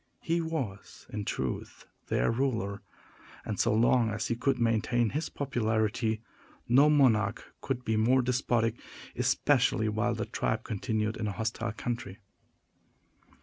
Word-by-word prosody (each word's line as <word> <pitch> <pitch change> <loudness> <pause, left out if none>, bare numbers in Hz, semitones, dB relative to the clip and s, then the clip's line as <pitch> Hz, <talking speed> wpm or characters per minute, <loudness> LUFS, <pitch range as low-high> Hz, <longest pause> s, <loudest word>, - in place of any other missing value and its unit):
He 170 +1 +1
was, 135 - -5
in 105 -2 -4
truth, 65 -8 -4 0.2
their - - +1
ruler; 115 -6 -1 0.6
and, - - -4
so - - +3
long 115 +1 +3
as 105 0 -3
he 115 - +1
could 135 +3 +1
maintain 115 0 +1
his 155 +3 -2
popularity, 110 -3 -1 0.4
no 135 +5 +6
monarch 115 -8 +2
could 125 -2 -3
be 110 -1 +1
more 125 +4 +4
despotic, 120 -2 0 0.3
especially 125 -5 +2
while 105 0 0
the - - -2
tribe 110 0 -2
continued 110 0 -2
in 110 - -2
a - - -1
hostile 115 +1 -2
country. 115 -4 -4
115 Hz, 135 wpm, -29 LUFS, 110-125 Hz, 0.6 s, no